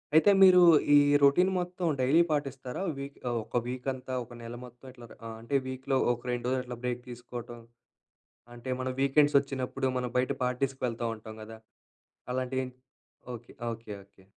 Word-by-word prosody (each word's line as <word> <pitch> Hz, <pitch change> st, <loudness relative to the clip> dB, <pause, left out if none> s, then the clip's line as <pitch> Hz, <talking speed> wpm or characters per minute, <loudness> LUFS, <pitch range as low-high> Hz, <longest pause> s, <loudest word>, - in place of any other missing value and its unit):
అయితే, 160 Hz, +6 st, +7 dB
మీరు 185 Hz, -1 st, +8 dB, 0.3 s
ఈ -, -, +9 dB, 0.3 s
రొటీన్ 160 Hz, +7 st, +5 dB
మొత్తం 180 Hz, 0 st, -3 dB
డైలీ 135 Hz, +6 st, +4 dB
పాటిస్తారా? 135 Hz, -2 st, -3 dB, 0.2 s
వీక్ 140 Hz, +1 st, -7 dB
ఆహ్, 120 Hz, -, -1 dB
ఒక 120 Hz, -, -3 dB
వీక్ 125 Hz, +1 st, -5 dB
అంతా 130 Hz, 0 st, -7 dB
ఒక 120 Hz, +1 st, -13 dB
నెల 115 Hz, +1 st, -7 dB
మొత్తం 125 Hz, +1 st, -16 dB
ఇట్లా 120 Hz, -2 st, -13 dB, 0.2 s
ఆహ్, 115 Hz, -, -7 dB
అంటే 130 Hz, +5 st, 0 dB
వీక్‍లో 130 Hz, +1 st, -1 dB, 0.2 s
ఒక 120 Hz, -, -9 dB
2 120 Hz, -1 st, -3 dB
రోజులు 130 Hz, 0 st, +1 dB
అట్లా 125 Hz, -1 st, -7 dB
బ్రేక్ 125 Hz, 0 st, -2 dB
తీసుకోటం, 120 Hz, -1 st, -8 dB, 1.0 s
అంటే 120 Hz, +2 st, -7 dB
మనం 130 Hz, 0 st, -2 dB
వీకెండ్సొచ్చినప్పుడు 140 Hz, -2 st, +2 dB
మనం 125 Hz, -1 st, -3 dB
బయట 125 Hz, 0 st, +1 dB
పార్టీస్‌కి 130 Hz, +2 st, -2 dB
వెళ్తా 115 Hz, -1 st, -3 dB
ఉంటాం 110 Hz, 0 st, -11 dB
గదా! 110 Hz, +1 st, -10 dB, 0.7 s
అలాంటివి 130 Hz, +1 st, -1 dB
ఎంటి 125 Hz, 0 st, -14 dB, 0.6 s
ఓకె. 120 Hz, 0 st, -11 dB, 0.2 s
Okay, 115 Hz, -1 st, -9 dB
okay. 100 Hz, -1 st, -24 dB
125 Hz, 165 wpm, -29 LUFS, 120-135 Hz, 1.0 s, ఈ